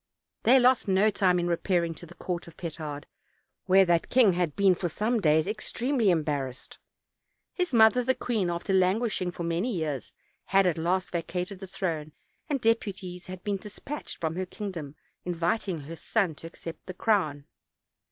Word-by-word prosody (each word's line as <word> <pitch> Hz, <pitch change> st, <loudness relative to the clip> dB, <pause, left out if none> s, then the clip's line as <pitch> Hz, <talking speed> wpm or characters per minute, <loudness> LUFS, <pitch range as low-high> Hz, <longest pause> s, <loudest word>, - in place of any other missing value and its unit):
They 255 Hz, +4 st, +6 dB
lost 255 Hz, -2 st, +4 dB
no 195 Hz, +3 st, +4 dB
time 185 Hz, -3 st, +3 dB
in 175 Hz, -, 0 dB
repairing 170 Hz, -1 st, +1 dB
to 170 Hz, -, -10 dB
the 175 Hz, -, -14 dB
court 175 Hz, -2 st, -4 dB
of 170 Hz, -, -14 dB
Petard, 155 Hz, -3 st, -6 dB, 0.6 s
where 190 Hz, +1 st, +6 dB
that 170 Hz, -2 st, +2 dB
king 240 Hz, -7 st, +5 dB
had 170 Hz, -4 st, -1 dB
been 195 Hz, -2 st, +5 dB
for 175 Hz, 0 st, -2 dB
some 220 Hz, +8 st, 0 dB
days 155 Hz, -1 st, +4 dB
extremely 225 Hz, +3 st, 0 dB
em 165 Hz, -4 st, +3 dB
barrassed. 135 Hz, -4 st, -4 dB, 0.7 s
His 360 Hz, -4 st, -1 dB
mother 230 Hz, +1 st, +5 dB
the 260 Hz, +2 st, +2 dB
queen, 215 Hz, -7 st, -1 dB
after 175 Hz, +3 st, -2 dB
languishing 190 Hz, +1 st, +2 dB
for 175 Hz, -1 st, -6 dB
many 170 Hz, +8 st, 0 dB
years, 155 Hz, -, -3 dB, 0.3 s
had 195 Hz, 0 st, +4 dB
at 170 Hz, -3 st, +1 dB
last 180 Hz, +3 st, 0 dB
vacated 180 Hz, +3 st, -3 dB
the 195 Hz, -, -7 dB
throne, 160 Hz, -5 st, -3 dB, 0.4 s
and 285 Hz, -2 st, 0 dB
deputies 195 Hz, -6 st, -1 dB
had 185 Hz, -1 st, -8 dB
been 205 Hz, -1 st, -1 dB
dispatched 210 Hz, +9 st, -7 dB
from 160 Hz, -1 st, -2 dB
her 185 Hz, 0 st, -2 dB
kingdom 175 Hz, -8 st, -6 dB, 0.3 s
inviting 175 Hz, 0 st, -1 dB
her 155 Hz, +4 st, -8 dB
son 190 Hz, 0 st, 0 dB
to 155 Hz, +2 st, -10 dB
accept 165 Hz, -1 st, -10 dB
the 185 Hz, -, -6 dB
crown. 155 Hz, -10 st, +1 dB
180 Hz, 170 wpm, -28 LUFS, 165-210 Hz, 0.7 s, They